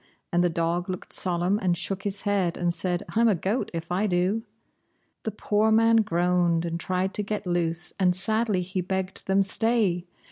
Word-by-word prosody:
And 175 Hz, +1 st, +3 dB
the 175 Hz, -, +3 dB
dog 170 Hz, +2 st, -1 dB
looked 185 Hz, -, -5 dB
solemn 180 Hz, +2 st, 0 dB
and 180 Hz, -3 st, +1 dB
shook 190 Hz, +2 st, -3 dB
his 200 Hz, 0 st, -2 dB
head, 195 Hz, -4 st, 0 dB
and 175 Hz, -1 st, 0 dB
said: 180 Hz, 0 st, -2 dB
"I'm 230 Hz, +1 st, +2 dB
a 215 Hz, -, +3 dB
goat 195 Hz, +8 st, -2 dB
if 165 Hz, 0 st, -6 dB
I 195 Hz, +4 st, +1 dB
do!" 185 Hz, +4 st, +1 dB, 0.8 s
The -, -, 0 dB
poor 215 Hz, +1 st, +1 dB
man 225 Hz, +1 st, +5 dB
groaned 175 Hz, -4 st, +1 dB
and 170 Hz, 0 st, -3 dB
tried 185 Hz, +2 st, -1 dB
to -, -, -1 dB
get 210 Hz, 0 st, -4 dB
loose, 175 Hz, -1 st, 0 dB
and 180 Hz, -2 st, +3 dB
sadly 215 Hz, 0 st, +1 dB
he 185 Hz, +1 st, -3 dB
begged 190 Hz, +1 st, -4 dB
them, 195 Hz, +1 st, +3 dB
"Stay! 200 Hz, -4 st, +2 dB
185 Hz, 185 wpm, -26 LUFS, 175-205 Hz, 0.8 s, man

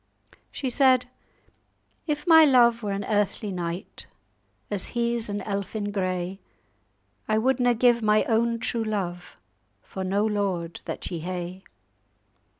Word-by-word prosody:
She 260 Hz, -3 st, -3 dB
said:— 255 Hz, -1 st, +4 dB, 1.0 s
"'If 300 Hz, -1 st, -2 dB
my 325 Hz, -2 st, +8 dB
love 240 Hz, -5 st, +5 dB
were 210 Hz, -, -3 dB
an 195 Hz, 0 st, -3 dB
earthly 205 Hz, 0 st, 0 dB
knight, 175 Hz, +1 st, -5 dB, 0.6 s
As 200 Hz, -2 st, -2 dB
he's 235 Hz, -1 st, 0 dB
an 205 Hz, 0 st, -3 dB
elfin 205 Hz, +1 st, -3 dB
grey, 185 Hz, -1 st, -2 dB, 0.9 s
I 215 Hz, -, +2 dB
wouldna 245 Hz, +1 st, +2 dB
give 240 Hz, 0 st, +3 dB
my 215 Hz, 0 st, +3 dB
own 230 Hz, +1 st, +1 dB
true 230 Hz, 0 st, -2 dB
love 185 Hz, -5 st, -4 dB, 0.5 s
For 190 Hz, -, -6 dB
no 200 Hz, +3 st, +1 dB
lord 195 Hz, -6 st, -2 dB
that -, -, -5 dB
ye 170 Hz, -, -3 dB
hae. 180 Hz, +2 st, -5 dB
210 Hz, 130 wpm, -25 LUFS, 190-235 Hz, 1.0 s, my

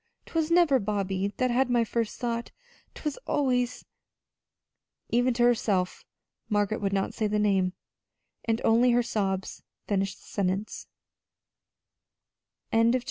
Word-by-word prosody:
'Twas 325 Hz, -1 st, -1 dB
never 335 Hz, -6 st, +5 dB
Bobby 200 Hz, -2 st, -1 dB
that 255 Hz, -1 st, +1 dB
had 250 Hz, +1 st, +2 dB
my 240 Hz, -1 st, +3 dB
first 230 Hz, 0 st, -2 dB
thought. 235 Hz, -1 st, -2 dB, 0.5 s
'Twas 300 Hz, -2 st, -4 dB
always 250 Hz, -3 st, 0 dB, 0.6 s
" -, -, -59 dB
Even 245 Hz, +2 st, +3 dB
to 240 Hz, -, +2 dB
herself 210 Hz, -6 st, +1 dB, 0.5 s
Margaret 205 Hz, 0 st, 0 dB
would 200 Hz, -1 st, 0 dB
not 195 Hz, -1 st, -1 dB
say 215 Hz, -, 0 dB
the 210 Hz, 0 st, 0 dB
name, 195 Hz, -3 st, +2 dB, 0.7 s
and 225 Hz, 0 st, 0 dB
only 235 Hz, +2 st, +5 dB
her 245 Hz, 0 st, +3 dB
sobs 195 Hz, -4 st, -2 dB, 0.2 s
finished 195 Hz, -1 st, -1 dB
the -, -, -20 dB
sentence. 195 Hz, +1 st, -2 dB
225 Hz, 125 wpm, -27 LUFS, 200-245 Hz, 0.7 s, never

